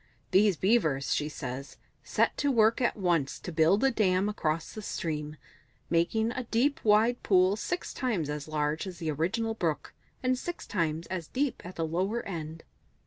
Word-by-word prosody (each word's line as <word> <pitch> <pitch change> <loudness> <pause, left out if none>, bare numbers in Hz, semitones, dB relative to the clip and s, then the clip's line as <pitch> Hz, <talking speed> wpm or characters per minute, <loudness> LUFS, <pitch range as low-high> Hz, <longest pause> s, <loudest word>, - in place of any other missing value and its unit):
These 195 -2 +4
Beavers, 160 - +2
she 150 0 -1
says, 135 -2 -6 0.3
set - - +1
to 285 -1 +2
work 225 -1 +4
at 240 - +1
once 170 -8 +1
to 175 - -7
build 165 +7 +3
a 270 - +4
dam 195 -3 +2
across 160 -6 -2
the 215 - -6
stream, 155 -5 -4 0.5
making 220 +7 +2
a 255 0 -4
deep 250 +6 +1
wide 220 +3 +4
pool 185 0 +4
six 355 +11 -3
times 220 - -1
as 150 0 -4
large 155 +3 -1
as 180 -2 -7
the 160 -1 -2
original 200 +10 -1
brook, 165 -8 -2 0.3
and 255 0 +1
six 350 +4 -5
times 165 -4 -1
as 175 -4 -3
deep 270 0 -2
at 180 +1 -9
the 165 - -1
lower 190 +8 -1
end." 160 -3 -6
185 Hz, 175 wpm, -29 LUFS, 155-225 Hz, 0.5 s, These